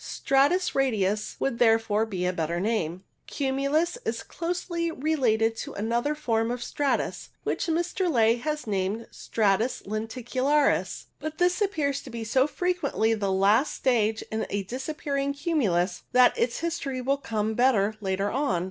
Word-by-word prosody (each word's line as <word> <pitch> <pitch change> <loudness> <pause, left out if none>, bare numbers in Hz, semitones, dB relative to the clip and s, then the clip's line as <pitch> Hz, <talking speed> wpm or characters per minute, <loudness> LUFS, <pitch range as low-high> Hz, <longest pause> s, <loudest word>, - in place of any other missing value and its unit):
Stratus 285 +7 +2
radius 215 -6 0
would 255 -4 -1
therefore 225 -2 +3
be 185 -4 -3
a 180 - +1
better 170 0 -2
name. 185 -4 -1 0.2
Cumulus 280 - 0
is - - -3
closely 340 0 -3
related 250 -8 +1
to - - -6
another 235 +8 -1
form 225 -6 0
of 245 0 -3
stratus, 280 +3 -1
which - - -1
Mr. 345 +3 0
Ley 230 -3 +4
has 300 +3 -3
named 205 +2 -1
stratus 220 +3 0
lenticu 225 +4 -4
laris, 290 +1 +2
but 310 0 -5
this 355 +3 +2
appears 300 -9 0
to - - -11
be 230 -1 -5
so 260 +5 +2
frequently 345 -10 0
the 200 -3 -1
last 205 +9 +3
stage 225 -4 +1
in 220 0 -2
a 200 0 -2
disappearing 275 +4 -3
cumulus 210 - 0
that 250 0 +6
its 240 0 -1
history 320 -6 -2
will 270 +2 +1
come 220 -5 -2
better 220 -4 +3
later 195 +1 -1
on. 260 -10 0
245 Hz, 150 wpm, -26 LUFS, 215-290 Hz, 0.2 s, that